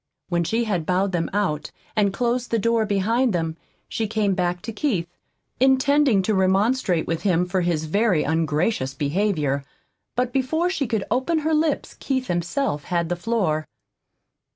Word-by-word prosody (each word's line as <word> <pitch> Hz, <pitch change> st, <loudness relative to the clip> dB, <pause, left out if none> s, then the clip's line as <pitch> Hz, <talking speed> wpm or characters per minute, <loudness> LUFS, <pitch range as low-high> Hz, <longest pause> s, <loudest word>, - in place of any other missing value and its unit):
When 170 Hz, -1 st, +1 dB
she 225 Hz, +8 st, 0 dB
had 185 Hz, -8 st, -2 dB
bowed 185 Hz, +2 st, +1 dB
them 170 Hz, -2 st, -1 dB
out 170 Hz, -7 st, -1 dB, 0.3 s
and 205 Hz, -2 st, +3 dB
closed 245 Hz, +3 st, -1 dB
the 230 Hz, -, +1 dB
door 230 Hz, 0 st, +1 dB
behind 220 Hz, +4 st, +1 dB
them, 165 Hz, -2 st, -1 dB, 0.3 s
she 225 Hz, -, -2 dB
came 210 Hz, -2 st, +1 dB
back 180 Hz, -1 st, -1 dB
to 230 Hz, -, -5 dB
Keith, 210 Hz, -, 0 dB, 0.5 s
intending 265 Hz, -4 st, +4 dB
to 215 Hz, -, +1 dB
remonstrate 190 Hz, -1 st, +2 dB
with 165 Hz, -1 st, -2 dB
him 180 Hz, -3 st, +2 dB
for 180 Hz, +1 st, 0 dB
his 170 Hz, -3 st, 0 dB
very 200 Hz, 0 st, +2 dB
ungracious 155 Hz, -2 st, 0 dB
behavior. 145 Hz, -2 st, 0 dB, 0.5 s
But 250 Hz, 0 st, 0 dB
before 315 Hz, +7 st, +1 dB
she 285 Hz, -8 st, -1 dB
could 220 Hz, -3 st, -1 dB
open 260 Hz, +8 st, +1 dB
her 320 Hz, -, +2 dB
lips 305 Hz, -1 st, 0 dB
Keith 260 Hz, -2 st, -2 dB
himself 175 Hz, -, -1 dB
had 170 Hz, -2 st, -1 dB
the 175 Hz, -, 0 dB
floor. 175 Hz, -6 st, -1 dB
200 Hz, 160 wpm, -23 LUFS, 170-240 Hz, 0.5 s, intending